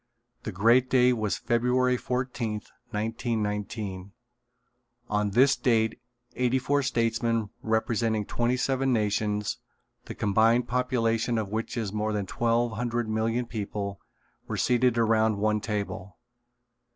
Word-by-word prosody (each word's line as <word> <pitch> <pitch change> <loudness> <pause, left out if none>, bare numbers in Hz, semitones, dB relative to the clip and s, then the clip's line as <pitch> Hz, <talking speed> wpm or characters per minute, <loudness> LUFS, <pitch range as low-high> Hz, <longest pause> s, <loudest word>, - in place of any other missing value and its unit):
The - - -5
great 120 +7 +4
day 125 -1 +4
was 110 -4 -1
February 125 +1 +2
fourteenth, 125 -4 -3 0.2
1919. 105 -3 -3 1.0
On 105 0 +1
this 130 +7 +4
date 110 -2 +1 0.4
eighty 125 +1 +2
four 140 +2 +1
statesmen 115 -3 0
representing 110 -1 0
twenty 120 +4 0
seven 135 +1 +1
nations, 105 -2 0 0.5
the - - -7
combined 115 +4 +3
population 120 -2 0
of 110 -3 -2
which 110 +3 -3
is 105 -4 -2
more 110 0 -1
than 105 -2 -1
twelve 120 +3 +1
hundred 120 +1 -2
million 115 +3 0
people, 100 -3 -5 0.5
were - - -3
seated 125 -1 +2
around 110 -2 +3
one 105 +1 +1
table. 100 -3 -4
115 Hz, 120 wpm, -27 LUFS, 105-120 Hz, 1.0 s, great